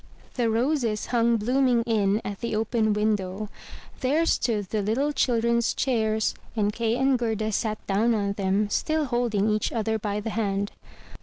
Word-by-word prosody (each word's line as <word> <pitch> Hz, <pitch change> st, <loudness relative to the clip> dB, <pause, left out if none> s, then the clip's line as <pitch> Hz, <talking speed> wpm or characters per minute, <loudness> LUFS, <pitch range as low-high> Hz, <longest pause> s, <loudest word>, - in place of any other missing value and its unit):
The 240 Hz, -3 st, 0 dB
roses 230 Hz, -2 st, 0 dB
hung 235 Hz, -1 st, +3 dB
blooming 245 Hz, +1 st, +2 dB
in 215 Hz, -2 st, +1 dB
at 200 Hz, -1 st, -5 dB
the 235 Hz, -2 st, -2 dB
open 220 Hz, 0 st, +1 dB
window; 210 Hz, -1 st, -1 dB, 0.5 s
there 290 Hz, +5 st, +2 dB
stood 220 Hz, -, 0 dB
the 215 Hz, -, 0 dB
little 240 Hz, +9 st, 0 dB
children's 235 Hz, -3 st, +1 dB
chairs, 220 Hz, -4 st, +1 dB, 0.2 s
and 210 Hz, -2 st, +1 dB
Kay 230 Hz, +1 st, 0 dB
and 265 Hz, -1 st, +2 dB
Gerda 220 Hz, -2 st, -1 dB
sat 215 Hz, 0 st, -2 dB
down 220 Hz, +4 st, +2 dB
on 200 Hz, -2 st, 0 dB
them, 200 Hz, +1 st, 0 dB
still 310 Hz, -1 st, 0 dB
holding 240 Hz, -5 st, 0 dB
each 215 Hz, 0 st, 0 dB
other 220 Hz, -1 st, -1 dB
by 205 Hz, 0 st, -2 dB
the 220 Hz, +1 st, -4 dB
hand. 200 Hz, -2 st, -1 dB
220 Hz, 160 wpm, -26 LUFS, 210-240 Hz, 0.5 s, hung